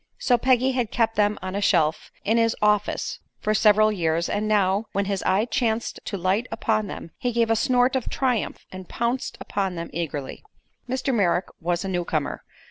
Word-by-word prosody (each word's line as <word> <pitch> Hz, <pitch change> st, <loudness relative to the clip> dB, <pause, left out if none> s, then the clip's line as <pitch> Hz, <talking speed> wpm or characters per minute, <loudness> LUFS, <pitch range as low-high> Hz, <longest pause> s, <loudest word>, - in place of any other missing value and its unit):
So 245 Hz, -, +3 dB
Peggy 255 Hz, +2 st, +3 dB
had 250 Hz, -4 st, -1 dB
kept 225 Hz, -1 st, +1 dB
them 210 Hz, 0 st, +2 dB
on 185 Hz, 0 st, -4 dB
a 200 Hz, -, -1 dB
shelf 165 Hz, -6 st, +2 dB, 0.2 s
in 220 Hz, +3 st, +2 dB
his 230 Hz, 0 st, +2 dB
"office" 210 Hz, 0 st, +1 dB, 0.2 s
for 215 Hz, -, 0 dB
several 215 Hz, 0 st, +5 dB
years, 170 Hz, -3 st, 0 dB
and 210 Hz, +1 st, -1 dB
now, 205 Hz, 0 st, +2 dB
when 200 Hz, 0 st, 0 dB
his 195 Hz, -1 st, -2 dB
eye 195 Hz, +4 st, +3 dB
chanced 235 Hz, -4 st, -1 dB
to 200 Hz, -, -3 dB
light 190 Hz, +7 st, 0 dB
upon 215 Hz, -2 st, 0 dB
them, 170 Hz, -, -8 dB
he 245 Hz, -, -1 dB
gave 230 Hz, -1 st, +1 dB
a -, -, +4 dB
snort 250 Hz, +3 st, +2 dB
of 260 Hz, -, -1 dB
triumph 250 Hz, -5 st, -1 dB
and 185 Hz, -1 st, -9 dB
pounced 235 Hz, +2 st, -2 dB
upon 195 Hz, -3 st, -2 dB
them 170 Hz, 0 st, -6 dB
eagerly. 150 Hz, -5 st, -4 dB, 0.5 s
Mr. 260 Hz, +1 st, -1 dB
Merrick 190 Hz, -5 st, +1 dB
was 175 Hz, +2 st, -1 dB
a -, -, -2 dB
newcomer. 170 Hz, -5 st, -2 dB
210 Hz, 190 wpm, -24 LUFS, 185-235 Hz, 0.5 s, several